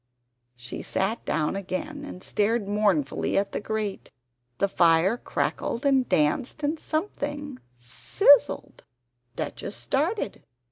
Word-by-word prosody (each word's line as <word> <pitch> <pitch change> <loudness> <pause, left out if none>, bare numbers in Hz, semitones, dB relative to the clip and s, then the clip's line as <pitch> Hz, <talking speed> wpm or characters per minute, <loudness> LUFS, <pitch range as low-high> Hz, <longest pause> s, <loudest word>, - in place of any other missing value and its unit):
She 120 0 -7
sat 195 +5 -1
down 155 +3 0
again, 200 +10 -4
and 185 -10 -9
stared 215 0 0
mournfully 200 -9 +1
at 200 0 +1
the - - -2
grate. 215 -1 -3 0.5
The 200 - +2
fire 170 +2 +4
crackled 240 +1 -2
and 265 -3 +3
danced, 155 - +1
and 305 +2 0
something 290 -5 -3 0.2
sizz 180 - +5
z - - -4
zled! - - -13 0.6
Duchess - - -5
started! 300 - -1
215 Hz, 125 wpm, -26 LUFS, 185-285 Hz, 0.6 s, sizz